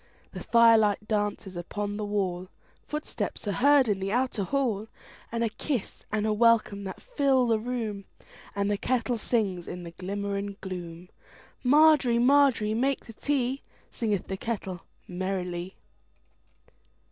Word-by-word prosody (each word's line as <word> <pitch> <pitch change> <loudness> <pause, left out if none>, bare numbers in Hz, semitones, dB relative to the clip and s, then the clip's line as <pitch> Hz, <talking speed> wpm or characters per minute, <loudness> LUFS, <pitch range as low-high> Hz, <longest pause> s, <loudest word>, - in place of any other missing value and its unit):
The - - -7
firelight 225 -3 +4
dances 205 -3 -2
upon 205 +4 -4
the 215 - -3
wall, 185 -3 -2 0.4
Footsteps 300 -7 -4
are - - +1
heard 275 +3 +4
in 205 -3 0
the 195 +1 -2
outer 245 -3 0
hall, 225 -3 -1 0.4
And 230 0 -1
a 230 - +1
kiss 230 +1 -4
and 215 0 0
a 215 - +2
welcome 215 -3 +3
that 190 - -6
fill 275 - +2
the 225 -2 +2
room, 220 -4 -4 0.5
And 200 0 0
the 205 - -1
kettle 245 -1 0
sings 200 -7 -1
in 180 0 -6
the 170 - -8
glimmer 200 +3 -4
and 200 0 -5
gloom. 180 -2 -7 0.5
Margery, 285 -3 +5
Margery, 250 -4 +4
make 265 +4 0
the 225 - -11
tea, 270 +1 -1 0.3
Singeth 210 -5 -1
the 190 - -4
kettle 195 -6 -4 0.3
merrily. 180 -1 -3
210 Hz, 145 wpm, -27 LUFS, 195-245 Hz, 0.5 s, Margery